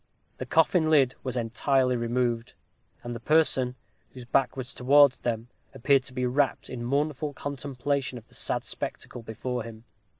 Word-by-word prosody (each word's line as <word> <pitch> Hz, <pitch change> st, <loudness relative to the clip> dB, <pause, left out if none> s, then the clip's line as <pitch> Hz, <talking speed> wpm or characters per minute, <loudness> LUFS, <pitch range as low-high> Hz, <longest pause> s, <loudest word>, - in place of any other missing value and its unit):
The -, -, -5 dB
coffin 160 Hz, 0 st, +3 dB
lid 135 Hz, -5 st, +4 dB
was 130 Hz, -1 st, -3 dB
entirely 125 Hz, +2 st, +1 dB
removed, 120 Hz, 0 st, -1 dB, 0.5 s
and 120 Hz, 0 st, -5 dB
the -, -, -6 dB
person, 130 Hz, -3 st, +2 dB, 0.4 s
whose 125 Hz, -2 st, -9 dB
back 130 Hz, +2 st, +1 dB
was 130 Hz, +1 st, -3 dB
towards 140 Hz, +1 st, +5 dB
them 115 Hz, 0 st, -3 dB, 0.3 s
appeared 135 Hz, +2 st, +3 dB
to 130 Hz, -, -7 dB
be 125 Hz, 0 st, -1 dB
wrapped 135 Hz, +1 st, 0 dB
in 120 Hz, -2 st, -5 dB
mournful 145 Hz, +3 st, -1 dB
contemplation 140 Hz, -1 st, -3 dB
of 115 Hz, -, -12 dB
the -, -, -22 dB
sad -, -, -1 dB
spectacle 120 Hz, -, -5 dB
before 120 Hz, +2 st, -4 dB
him. 110 Hz, -1 st, -9 dB
130 Hz, 160 wpm, -27 LUFS, 120-140 Hz, 0.5 s, towards